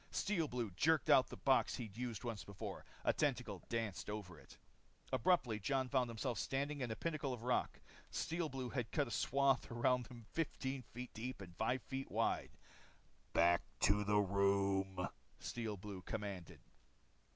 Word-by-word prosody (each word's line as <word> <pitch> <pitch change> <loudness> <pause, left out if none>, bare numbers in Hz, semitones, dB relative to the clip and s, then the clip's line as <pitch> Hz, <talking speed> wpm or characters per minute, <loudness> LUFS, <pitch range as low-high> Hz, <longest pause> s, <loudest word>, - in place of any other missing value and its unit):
Steel 180 -6 +1
Blue 120 -6 -2
jerked 155 - +3
out 130 - +7
the - - -8
box 135 -1 +3
he'd 110 -5 -6
used 120 -3 -3
once 115 -4 -3
before. 100 -1 -6 0.2
A - - +5
tentacle 125 - 0
danced 115 -5 -2
over 95 -6 -5
it. - - -15 0.6
Abruptly 120 -6 +3
Jon 130 +4 +1
found 130 -3 +2
himself 115 +1 -2
standing 140 +1 -1
on 125 - -1
a 110 - -2
pinnacle 155 -4 -1
of 120 -2 -6
rock. 125 0 +1 0.3
Steel 165 -1 -1
Blue 130 -2 -3
had 125 -4 -2
cut 145 -3 +2
a - - -7
swath 135 +6 +3
around 120 +1 +2
him 120 -3 -11
15 135 -4 -1
feet 125 +2 -7
deep 125 +4 -4
and 90 -3 -9
five 125 +6 0
feet 135 0 -4
wide. - - 0 0.8
"Back 85 +1 +5 0.2
to 105 +2 +4
the 105 +1 +3
room," 100 -1 +2 0.3
Steel 110 -3 -3
Blue 95 -1 -7
commanded. 95 -2 -5
120 Hz, 160 wpm, -39 LUFS, 100-135 Hz, 0.8 s, out